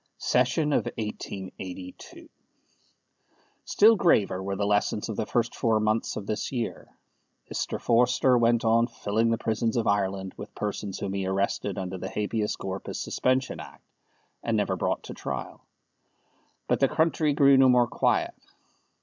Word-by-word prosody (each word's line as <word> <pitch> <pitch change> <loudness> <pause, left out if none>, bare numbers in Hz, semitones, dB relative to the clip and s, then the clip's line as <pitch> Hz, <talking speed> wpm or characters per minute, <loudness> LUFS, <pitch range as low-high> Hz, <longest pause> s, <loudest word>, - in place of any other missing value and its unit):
SESSION 130 +5 +1
OF - - +1
1882. 95 -4 -7 1.4
Still 220 +2 +5
graver 105 - +2
were 100 +1 -3
the 100 +1 -1
lessons 105 +1 0
of 110 - -3
the 105 - -2
first 120 -1 0
four 110 -2 +2
months 110 +1 0
of 105 - -5
this 105 0 -3
year. 120 -4 -4 0.7
Mr. - - -2
Forster 125 +2 +3
went 120 -1 +3
on 115 +1 +4
filling 115 -1 -1
the 115 - +1
prisons 110 +1 -1
of 115 - +1
Ireland 95 -1 0
with - - -9
persons 105 -2 -4
whom 100 -1 -4
he 95 -1 -2
arrested 100 0 -1
under 95 -1 -4
the - - -5
Habeas 105 0 -2
Corpus 95 0 -5
Suspension 130 +1 0
Act, - - -12 0.6
and 115 -2 0
never 100 -2 0
brought 90 - -1
to - - -8
trial. - - -6 1.0
But - - +1
the - - +4
country 160 -2 +1
grew 140 -1 +6
no 130 -1 +6
more 125 -1 +5
quiet. 115 - 0
110 Hz, 150 wpm, -27 LUFS, 100-120 Hz, 1.4 s, grew